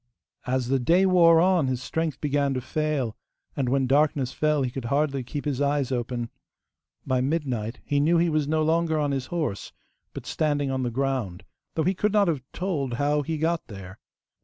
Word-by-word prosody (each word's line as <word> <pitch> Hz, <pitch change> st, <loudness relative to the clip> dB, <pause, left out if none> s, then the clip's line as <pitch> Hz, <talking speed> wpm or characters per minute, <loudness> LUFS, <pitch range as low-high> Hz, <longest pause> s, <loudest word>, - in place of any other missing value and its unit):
As 125 Hz, -1 st, 0 dB
the 135 Hz, 0 st, +2 dB
day 170 Hz, +9 st, +3 dB
wore 170 Hz, -3 st, +6 dB
on, 180 Hz, -4 st, +3 dB
his 130 Hz, -1 st, -1 dB
strength 160 Hz, +2 st, -3 dB
began 140 Hz, -2 st, 0 dB
to -, -, 0 dB
fail, 140 Hz, -3 st, -2 dB, 0.4 s
and 130 Hz, -3 st, -1 dB
when 135 Hz, 0 st, +2 dB
darkness 140 Hz, -1 st, +2 dB
fell 150 Hz, -2 st, +1 dB
he 125 Hz, -, -2 dB
could 130 Hz, -1 st, -6 dB
hardly 140 Hz, +1 st, 0 dB
keep 140 Hz, +4 st, -6 dB
his 145 Hz, -2 st, -1 dB
eyes 140 Hz, -2 st, +1 dB
open. 120 Hz, -1 st, -3 dB, 0.7 s
By 130 Hz, -1 st, +1 dB
midnight 130 Hz, -6 st, -2 dB
he 145 Hz, -, +1 dB
knew 165 Hz, +4 st, +3 dB
he 170 Hz, +1 st, +3 dB
was 155 Hz, -3 st, 0 dB
no 155 Hz, +1 st, +1 dB
longer 160 Hz, 0 st, +1 dB
on 145 Hz, -2 st, 0 dB
his 135 Hz, -2 st, -2 dB
horse, 155 Hz, -, -3 dB, 0.4 s
but -, -, -7 dB
standing 145 Hz, -3 st, 0 dB
on 130 Hz, 0 st, -1 dB
the 125 Hz, -, -1 dB
ground, 125 Hz, -7 st, -2 dB, 0.3 s
though 160 Hz, -, +1 dB
he 185 Hz, -, +2 dB
could 205 Hz, +2 st, 0 dB
not 205 Hz, -2 st, +4 dB
have 150 Hz, -5 st, -1 dB
told 155 Hz, -9 st, -2 dB
how 145 Hz, +3 st, +1 dB
he 160 Hz, +3 st, -3 dB
got 165 Hz, +2 st, -1 dB
there. 95 Hz, -1 st, -10 dB
145 Hz, 195 wpm, -25 LUFS, 130-160 Hz, 0.7 s, wore